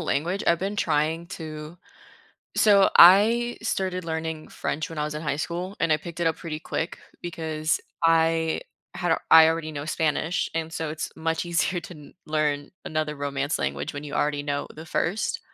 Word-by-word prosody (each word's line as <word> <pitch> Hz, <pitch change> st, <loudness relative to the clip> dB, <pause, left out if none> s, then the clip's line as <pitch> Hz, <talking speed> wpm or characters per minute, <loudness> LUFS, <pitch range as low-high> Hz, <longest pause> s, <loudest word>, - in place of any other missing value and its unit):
language, 165 Hz, +5 st, -1 dB
I've 170 Hz, -, +4 dB
been 195 Hz, +3 st, -3 dB
trying 160 Hz, -1 st, 0 dB
to 155 Hz, -1 st, -8 dB, 0.8 s
so 200 Hz, -2 st, +5 dB
I 225 Hz, +7 st, +7 dB
started 185 Hz, -4 st, -1 dB
learning 160 Hz, -1 st, -4 dB
French 155 Hz, +2 st, -3 dB
when 160 Hz, -, -7 dB
I 150 Hz, -, 0 dB
was 150 Hz, 0 st, -4 dB
in 150 Hz, -, -5 dB
high 150 Hz, -2 st, -1 dB
school, 175 Hz, +5 st, -4 dB
and -, -, +1 dB
I 155 Hz, -, +5 dB
picked 170 Hz, +2 st, -9 dB
it 170 Hz, -, +1 dB
up 160 Hz, -, +2 dB
pretty 155 Hz, -2 st, -5 dB
quick 165 Hz, 0 st, -3 dB, 0.2 s
because 160 Hz, -2 st, -2 dB, 0.2 s
I 165 Hz, 0 st, +3 dB, 0.3 s
had 175 Hz, -2 st, +1 dB
I 160 Hz, 0 st, +9 dB
already 160 Hz, -1 st, -2 dB
know 145 Hz, 0 st, -5 dB
Spanish, 160 Hz, +3 st, 0 dB
and 165 Hz, 0 st, -2 dB
so 160 Hz, -2 st, -3 dB
it's 155 Hz, 0 st, -4 dB
much 165 Hz, +1 st, -1 dB
easier 175 Hz, +1 st, 0 dB
to 170 Hz, +2 st, -10 dB
kn 150 Hz, -2 st, -14 dB
learn 150 Hz, -2 st, 0 dB
another 155 Hz, -1 st, -2 dB
romance 140 Hz, +1 st, -2 dB
language 70 Hz, -, -3 dB
when 145 Hz, +1 st, -6 dB
you 145 Hz, -, -8 dB
already 145 Hz, -1 st, 0 dB
know 145 Hz, 0 st, -2 dB
the 155 Hz, -, -9 dB
first 175 Hz, +7 st, -1 dB
160 Hz, 180 wpm, -25 LUFS, 150-170 Hz, 0.8 s, I